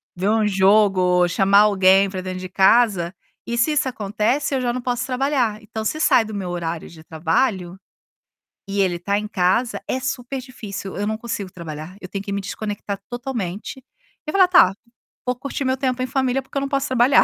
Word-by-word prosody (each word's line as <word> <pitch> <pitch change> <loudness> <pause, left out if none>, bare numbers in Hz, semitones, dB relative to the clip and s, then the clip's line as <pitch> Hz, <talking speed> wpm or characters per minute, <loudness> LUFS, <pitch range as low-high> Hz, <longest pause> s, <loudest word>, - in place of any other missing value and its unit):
ver 185 +3 0
um 220 -1 +2
jogo, 190 -2 +4
chamar 195 +3 +4
alguém 195 -1 +5
pra 190 -1 -5
dentro 185 0 -5
de 185 0 -7
casa, 190 -2 +3 0.3
e 235 - -3
se 235 +7 +3
isso 285 -3 +1
acontece 235 +5 -1
eu - - +1
já 240 -1 0
não 255 - -3
posso 245 0 -2
trabalhar, 255 -4 0
então 220 +1 -6
se 310 - -1
sai 245 -7 +4
do 215 - -8
meu 195 -3 -4
horario 170 -2 -4
de 160 -1 -14
trabalho 175 +4 -1 0.9
e 200 0 0
ele 180 -3 0
tá 200 +3 0
em 210 0 -3
casa, 210 +5 +1
é 260 - -1
super 260 0 -3
difícil, 210 -7 -7
eu 205 +2 -2
não 220 0 -1
consigo 220 -5 -5
trabalhar, 160 0 -8
eu 185 - -8
tenho 195 +1 -5
que 200 - -6
me 200 - -1
desconectar 205 0 -5
totalmente 240 -1 -5 0.4
e - - -1
falar: 380 0 +5
"Tá, 345 - +6 0.5
vou 250 0 0
curtir 275 +2 -4
meu 260 0 +2
tempo 255 -1 -1
em 255 - -1
família 260 +1 0
porque 270 - -8
eu - - +1
não 275 - -3
posso 275 0 0
trabalhar". 260 +1 +5
210 Hz, 200 wpm, -21 LUFS, 190-255 Hz, 0.9 s, Tá